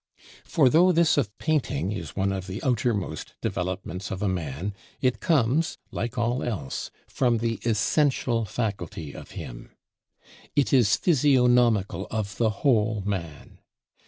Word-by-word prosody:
For 150 Hz, -6 st, +3 dB
though 170 Hz, +7 st, +5 dB
this 170 Hz, -2 st, +4 dB
of 110 Hz, -8 st, -1 dB
painting 120 Hz, -, 0 dB
is 85 Hz, -7 st, -6 dB
one 95 Hz, 0 st, +1 dB
of 95 Hz, -1 st, -4 dB
the 95 Hz, +2 st, -6 dB
outermost 110 Hz, -, -1 dB
developments 90 Hz, 0 st, -3 dB
of 95 Hz, +1 st, -4 dB
a -, -, +2 dB
man, 90 Hz, +1 st, -3 dB, 0.3 s
it 130 Hz, -2 st, +1 dB
comes 155 Hz, -1 st, +2 dB
like 120 Hz, +1 st, -4 dB
all 120 Hz, +2 st, 0 dB
else 80 Hz, -, -4 dB, 0.2 s
from 120 Hz, -3 st, +1 dB
the 115 Hz, 0 st, -1 dB
essential 120 Hz, +1 st, +1 dB
faculty 95 Hz, -, -4 dB
of -, -, -10 dB
him; -, -, -8 dB, 0.8 s
it 145 Hz, -1 st, +2 dB
is 120 Hz, -6 st, +5 dB
physiognomical 125 Hz, -, +3 dB
of 100 Hz, -2 st, -3 dB
the 115 Hz, -2 st, +3 dB
whole 110 Hz, -2 st, +1 dB
man. 85 Hz, -7 st, -5 dB
110 Hz, 135 wpm, -26 LUFS, 95-125 Hz, 0.8 s, though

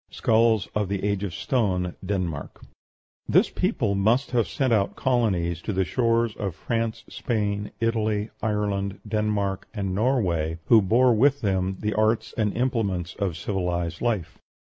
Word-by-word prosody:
SKULLS 110 Hz, -2 st, +2 dB
OF 105 Hz, -3 st, -1 dB
THE 100 Hz, -1 st, -2 dB
AGE 100 Hz, -1 st, 0 dB
OF 95 Hz, -5 st, -3 dB
STONE, 95 Hz, -8 st, 0 dB
DENMARK 90 Hz, -7 st, -3 dB, 0.7 s
This -, -, +4 dB
people 100 Hz, -, 0 dB
must 110 Hz, +7 st, +2 dB
have 120 Hz, -3 st, +2 dB
sent 130 Hz, -5 st, 0 dB
out 100 Hz, -3 st, +1 dB
colonies 95 Hz, -10 st, 0 dB
to 105 Hz, -, -3 dB
the 95 Hz, 0 st, +1 dB
shores 115 Hz, +3 st, +1 dB
of 95 Hz, -5 st, -3 dB
France, 115 Hz, -1 st, -2 dB
Spain, 105 Hz, -3 st, -2 dB
Italy, 110 Hz, -2 st, 0 dB
Ireland, 100 Hz, -2 st, -1 dB
Denmark, 105 Hz, -2 st, -1 dB
and 100 Hz, -3 st, -2 dB
Norway, 95 Hz, -, +1 dB
who 115 Hz, -2 st, +6 dB
bore 120 Hz, +6 st, +4 dB
with 140 Hz, +5 st, +3 dB
them 95 Hz, -2 st, 0 dB
the 105 Hz, 0 st, -1 dB
arts 110 Hz, +1 st, +1 dB
and 105 Hz, -3 st, +1 dB
implements 100 Hz, -8 st, -1 dB
of 95 Hz, -6 st, -2 dB
civilized 90 Hz, -2 st, -2 dB
life. 110 Hz, -9 st, -2 dB
105 Hz, 145 wpm, -25 LUFS, 95-115 Hz, 0.7 s, who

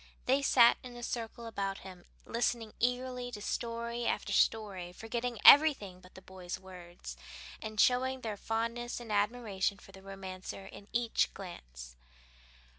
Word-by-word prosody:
They 270 Hz, +2 st, +3 dB
sat 240 Hz, -4 st, +6 dB
in 250 Hz, -1 st, -10 dB
a 240 Hz, -, -8 dB
circle 230 Hz, 0 st, -4 dB
about 195 Hz, -3 st, -3 dB
him, 185 Hz, -2 st, -11 dB, 0.2 s
listening 230 Hz, -1 st, -1 dB
eagerly 250 Hz, 0 st, -1 dB
to 210 Hz, -, -5 dB
story 235 Hz, +2 st, -3 dB
after -, -, -1 dB
story, 195 Hz, -5 st, +1 dB
forgetting 235 Hz, +4 st, -3 dB
everything 270 Hz, -12 st, +7 dB
but 180 Hz, -, -18 dB
the 190 Hz, -, -12 dB
boy's 185 Hz, -1 st, -7 dB
words, 180 Hz, -2 st, -10 dB, 0.5 s
and 215 Hz, -1 st, -6 dB
showing 260 Hz, +2 st, +3 dB
their 220 Hz, -3 st, -3 dB
fondness 230 Hz, +3 st, -2 dB
and 235 Hz, -2 st, -8 dB
admiration 205 Hz, -2 st, 0 dB
for 195 Hz, -, -16 dB
the 190 Hz, 0 st, -13 dB
romancer 190 Hz, 0 st, -7 dB
in 200 Hz, +1 st, -12 dB
each 235 Hz, -1 st, +1 dB
glance. -, -, -9 dB
220 Hz, 145 wpm, -32 LUFS, 190-240 Hz, 0.5 s, everything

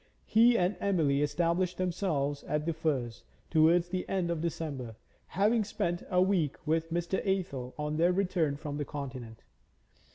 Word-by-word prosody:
He 235 Hz, +2 st, +5 dB
and 180 Hz, +2 st, +1 dB
Emily 160 Hz, -9 st, +2 dB
established 170 Hz, +4 st, 0 dB
themselves 160 Hz, -6 st, -1 dB
at 150 Hz, 0 st, -1 dB
The 165 Hz, -, 0 dB
Firs 135 Hz, -8 st, -2 dB, 0.3 s
towards 170 Hz, +2 st, +4 dB
the 185 Hz, 0 st, -3 dB
end 180 Hz, -3 st, 0 dB
of 165 Hz, -2 st, -2 dB
December, 145 Hz, -8 st, -4 dB, 0.3 s
having 215 Hz, +5 st, +2 dB
spent 175 Hz, -4 st, -2 dB
a 180 Hz, -, +2 dB
week 180 Hz, -7 st, +1 dB
with 160 Hz, +1 st, 0 dB
Mr. 175 Hz, +2 st, -1 dB
Athel 170 Hz, -11 st, -2 dB
on 150 Hz, 0 st, -2 dB
their 170 Hz, +2 st, +4 dB
return 180 Hz, -6 st, +1 dB
from 145 Hz, -1 st, -5 dB
the 145 Hz, -, -2 dB
Continent. 130 Hz, -6 st, -7 dB
165 Hz, 155 wpm, -30 LUFS, 145-180 Hz, 0.3 s, He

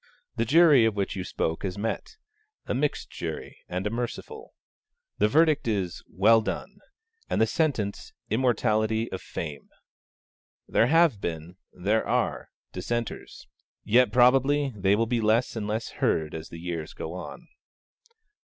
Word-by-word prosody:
The 115 Hz, -, 0 dB
jury 150 Hz, -2 st, +6 dB
of 110 Hz, -2 st, +1 dB
which 100 Hz, -1 st, -2 dB
you 95 Hz, -, -3 dB
spoke 80 Hz, -2 st, -2 dB
has 95 Hz, -1 st, -4 dB
met: 115 Hz, -, -4 dB, 0.5 s
a -, -, -2 dB
mixed 145 Hz, +3 st, -1 dB
jury -, -, -6 dB
and 90 Hz, +2 st, -3 dB
a 105 Hz, -, -1 dB
merciful. 120 Hz, +1 st, -6 dB, 0.6 s
The 105 Hz, -, +4 dB
verdict 155 Hz, +3 st, +3 dB
is 95 Hz, -6 st, -1 dB
'Well 110 Hz, +4 st, +4 dB
done,' 195 Hz, -, -5 dB, 0.5 s
and -, -, 0 dB
the 110 Hz, -, +5 dB
sentence 115 Hz, -, -1 dB, 0.2 s
Immortality 110 Hz, -1 st, +1 dB
of 95 Hz, -, -5 dB
Fame. 75 Hz, -4 st, -7 dB, 1.0 s
There 115 Hz, -, +3 dB
have 160 Hz, -7 st, +4 dB
been, 85 Hz, +2 st, -5 dB
there 105 Hz, +5 st, 0 dB
are, -, -, -1 dB, 0.2 s
dissenters; 120 Hz, -1 st, -4 dB, 0.4 s
yet 120 Hz, 0 st, +4 dB
probably 135 Hz, +3 st, +4 dB
they 100 Hz, 0 st, +2 dB
will 115 Hz, +2 st, +1 dB
be 115 Hz, 0 st, 0 dB
less 110 Hz, +4 st, +2 dB
and 105 Hz, -2 st, -3 dB
less 110 Hz, +2 st, -2 dB
heard 80 Hz, -2 st, 0 dB
as 80 Hz, 0 st, -7 dB
the 85 Hz, -, -9 dB
years 85 Hz, -2 st, -5 dB
go 80 Hz, -, -6 dB
on. 90 Hz, -1 st, -8 dB
110 Hz, 145 wpm, -27 LUFS, 95-125 Hz, 1.0 s, jury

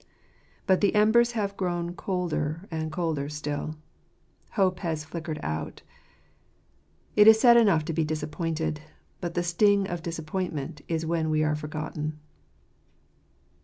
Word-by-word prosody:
But 190 Hz, -1 st, +3 dB
the 205 Hz, +1 st, +3 dB
embers 235 Hz, +3 st, +4 dB
have 200 Hz, -3 st, -2 dB
grown 175 Hz, -2 st, -2 dB
colder 175 Hz, -2 st, -2 dB
and 160 Hz, -1 st, -3 dB
colder 155 Hz, -4 st, -2 dB
still. 150 Hz, 0 st, -4 dB, 0.8 s
Hope 185 Hz, -3 st, +2 dB
has 160 Hz, -4 st, -3 dB
flickered 155 Hz, -1 st, -5 dB
out. 80 Hz, 0 st, -4 dB, 1.3 s
It 210 Hz, 0 st, +7 dB
is 220 Hz, 0 st, +9 dB
sad 240 Hz, 0 st, +7 dB
enough 200 Hz, -10 st, +4 dB
to 165 Hz, -, -3 dB
be 160 Hz, +1 st, +1 dB
disappointed; 155 Hz, 0 st, -2 dB, 0.4 s
but 170 Hz, -1 st, -4 dB
the 175 Hz, -, +1 dB
sting 200 Hz, +3 st, +3 dB
of 175 Hz, -3 st, -4 dB
disappointment 160 Hz, -3 st, -4 dB
is 165 Hz, -1 st, -1 dB
when 160 Hz, -1 st, 0 dB
we 155 Hz, 0 st, +2 dB
are 155 Hz, 0 st, +1 dB
forgotten. 150 Hz, 0 st, -4 dB
165 Hz, 130 wpm, -27 LUFS, 155-190 Hz, 1.3 s, is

